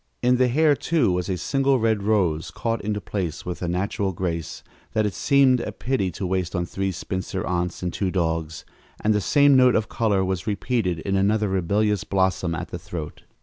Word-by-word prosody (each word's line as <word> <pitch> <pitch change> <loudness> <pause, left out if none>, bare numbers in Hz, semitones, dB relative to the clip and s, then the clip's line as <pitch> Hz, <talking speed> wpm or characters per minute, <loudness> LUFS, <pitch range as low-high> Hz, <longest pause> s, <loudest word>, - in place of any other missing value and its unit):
In 125 +1 +4
the 130 0 +4
hair, 150 +4 +3
too, 150 - +1
was 90 +1 -1
a 95 - -1
single 135 - +1
red 110 -3 +1
rose, 95 -7 +1
caught 115 -1 -2
into 105 0 -2
place 90 -6 -4
with 90 -1 -5
a 90 - -2
natural 95 +2 -1
grace 85 -3 -4 0.3
that 110 -1 +2
it 105 - -1
seemed 135 +4 +4
a - - -4
pity 125 -7 -1
to 95 - -4
waste 90 0 -1
on 90 -1 0
three 95 +2 -2
spinster 95 +1 -4
aunts 90 0 -2
and 90 - -2
two 95 - -1
dogs, 80 -3 -2 0.4
and 110 - +3
the 105 - +1
same 145 +5 +4
note 125 -1 +5
of 110 -1 0
color 100 -4 +1
was 95 +1 -3
repeated 100 -3 -1
in 100 +2 -1
another 105 +2 +2
rebellious 100 +2 +1
blossom 95 -3 0
at - - -5
the - - -6
throat. 80 -4 -7
95 Hz, 200 wpm, -24 LUFS, 90-110 Hz, 0.4 s, note